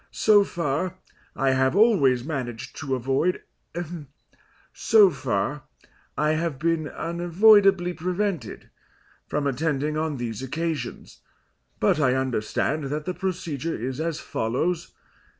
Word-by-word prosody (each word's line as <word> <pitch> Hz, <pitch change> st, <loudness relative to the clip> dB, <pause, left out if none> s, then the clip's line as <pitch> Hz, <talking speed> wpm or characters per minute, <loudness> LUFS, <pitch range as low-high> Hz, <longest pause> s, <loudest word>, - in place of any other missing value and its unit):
So 210 Hz, -2 st, +4 dB
far, 170 Hz, 0 st, -2 dB, 0.4 s
I 135 Hz, 0 st, +2 dB
have 130 Hz, +3 st, +2 dB
always 175 Hz, -, +4 dB
managed 125 Hz, -6 st, -5 dB
to 135 Hz, -3 st, -2 dB
avoid 135 Hz, +8 st, 0 dB, 1.3 s
so 210 Hz, -4 st, +5 dB
far, 130 Hz, +1 st, -2 dB, 0.5 s
I 150 Hz, 0 st, +2 dB
have 155 Hz, -2 st, -1 dB
been 160 Hz, +1 st, 0 dB
unavoidably 180 Hz, +3 st, +3 dB
prevented 180 Hz, -, -3 dB, 0.6 s
from 150 Hz, -1 st, -2 dB
attending 150 Hz, +1 st, -1 dB
on 155 Hz, -2 st, -1 dB
these 115 Hz, -2 st, -4 dB
occasions, 140 Hz, -, -4 dB, 0.6 s
but -, -, +2 dB
I 130 Hz, -3 st, +3 dB
understand 130 Hz, +3 st, -1 dB
that 150 Hz, +2 st, -3 dB
the 180 Hz, -, -2 dB
procedure 165 Hz, -5 st, -3 dB
is 130 Hz, +5 st, -4 dB
as 165 Hz, -1 st, -2 dB
follows. 160 Hz, +11 st, -2 dB
155 Hz, 115 wpm, -25 LUFS, 130-175 Hz, 1.3 s, so